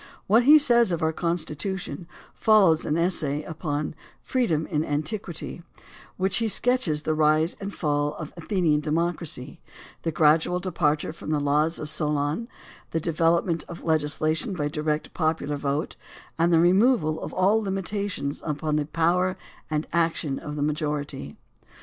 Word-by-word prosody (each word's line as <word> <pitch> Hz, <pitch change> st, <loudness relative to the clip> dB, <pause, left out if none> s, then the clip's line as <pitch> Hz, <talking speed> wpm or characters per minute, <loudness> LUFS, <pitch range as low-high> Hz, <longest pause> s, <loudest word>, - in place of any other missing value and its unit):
What 230 Hz, +5 st, +4 dB
he 300 Hz, +3 st, +9 dB
says 240 Hz, -7 st, +4 dB
of 170 Hz, -2 st, -1 dB
our 160 Hz, 0 st, +1 dB
Con 170 Hz, +1 st, 0 dB
stitution 165 Hz, 0 st, -4 dB, 0.3 s
follows 195 Hz, -8 st, +4 dB
an 150 Hz, -, 0 dB
essay 155 Hz, -4 st, 0 dB
upon 150 Hz, -2 st, -3 dB, 0.2 s
" -, -, -30 dB
Freedom 170 Hz, -, +1 dB
in 150 Hz, 0 st, -1 dB
Antiquity," 160 Hz, +4 st, -3 dB
in 170 Hz, -, -15 dB, 0.5 s
which 190 Hz, +1 st, +2 dB
he 230 Hz, -, +1 dB
sketches 215 Hz, -10 st, +1 dB
the 155 Hz, -, 0 dB
rise 155 Hz, +2 st, +2 dB
and 200 Hz, 0 st, -5 dB
fall 145 Hz, -4 st, -1 dB
of 155 Hz, -2 st, -8 dB
Athenian 170 Hz, -4 st, +1 dB
de 150 Hz, -, -5 dB
mocracy, 165 Hz, -2 st, -2 dB, 0.4 s
the 165 Hz, -, -1 dB
gradual 160 Hz, +3 st, +3 dB
departure 155 Hz, -5 st, 0 dB
from 160 Hz, -, -9 dB
the 155 Hz, -1 st, +1 dB
laws 150 Hz, +3 st, +1 dB
of 155 Hz, -, -5 dB
Solon, 150 Hz, +6 st, -1 dB, 0.4 s
the 165 Hz, -, -1 dB
development 165 Hz, +1 st, +1 dB
of 170 Hz, -, -9 dB
legislation 155 Hz, +4 st, +1 dB
by 145 Hz, -3 st, -1 dB
direct 150 Hz, 0 st, -2 dB
popular 160 Hz, -3 st, -1 dB
vote, 145 Hz, +2 st, -2 dB, 0.4 s
and 170 Hz, +1 st, +2 dB
the 165 Hz, -, +5 dB
removal 180 Hz, -2 st, +3 dB
of -, -, -5 dB
all 200 Hz, +4 st, +2 dB
limitations 195 Hz, -6 st, -3 dB
upon 150 Hz, 0 st, -1 dB
the 150 Hz, -1 st, -1 dB
power 175 Hz, +3 st, +1 dB, 0.3 s
and 155 Hz, 0 st, -1 dB
action 165 Hz, -4 st, 0 dB
of 150 Hz, -, -7 dB
the 145 Hz, -, -1 dB
majority. 150 Hz, -, -3 dB
160 Hz, 155 wpm, -25 LUFS, 150-180 Hz, 0.5 s, he